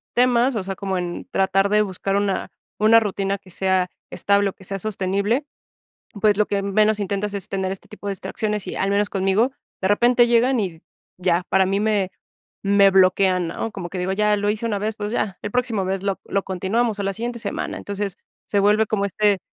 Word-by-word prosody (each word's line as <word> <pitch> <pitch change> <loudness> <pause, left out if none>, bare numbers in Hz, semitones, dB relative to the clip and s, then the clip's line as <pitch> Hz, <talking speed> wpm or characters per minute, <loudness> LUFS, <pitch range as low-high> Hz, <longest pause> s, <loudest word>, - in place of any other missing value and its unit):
temas, 245 0 +3
o 195 - -2
sea, 195 0 -4
como 190 -1 -2
en 175 -1 -5
tratar 195 +1 +2
de 210 0 +4
buscar 195 0 -2
una 200 -1 -1 0.3
una 220 +2 +6
rutina 200 -2 -1
que 185 - -18
sea 190 0 +1 0.2
estable 200 0 +2
o - - -17
que 190 - -16
sea 195 +2 -4
sostenible, 200 +6 -1 0.8
pues, 210 -2 +4
lo 210 - +3
que 200 -1 0
menos 210 +2 +2
intentas 200 +1 -2
es 200 +1 -5
tener 190 -1 -2
este 195 - -12
tipo 210 -1 -9
de 200 - 0
distracciones 210 +1 -3
y, - - -4
al 195 - 0
menos 205 0 +1
conmigo, 195 +6 +1 0.3
de 190 - +2
repente 240 +3 +4
llegan 240 +2 +3
y 175 -6 -3 0.4
ya, 180 -1 +1
para 190 0 +4
mí 195 +1 0
me 205 -3 +1 0.5
me 200 0 +5
bloquean, 185 -1 +3
¿no?, 225 - -4
como 180 -4 -6
que 190 - -6
digo: 185 +1 -1
"Ya 210 +1 +2
lo 205 - -1
hice 215 +2 -3
una 210 -3 -1
vez, 215 +1 -2
pues, 210 0 -4
ya, 200 -5 -2
el 205 - -4
próximo 240 -4 0
vez 190 0 -2
lo 195 -1 -1
lo 195 - -1
continuamos, 205 +4 -1
o - - -1
la 195 0 -1
siguiente 235 +3 -4
semana". - - -3
Entonces, 200 -1 -4 0.3
se 205 - +1
vuelve 210 +2 +4
como 200 -2 0
este 205 0 +2
200 Hz, 210 wpm, -22 LUFS, 190-215 Hz, 0.8 s, una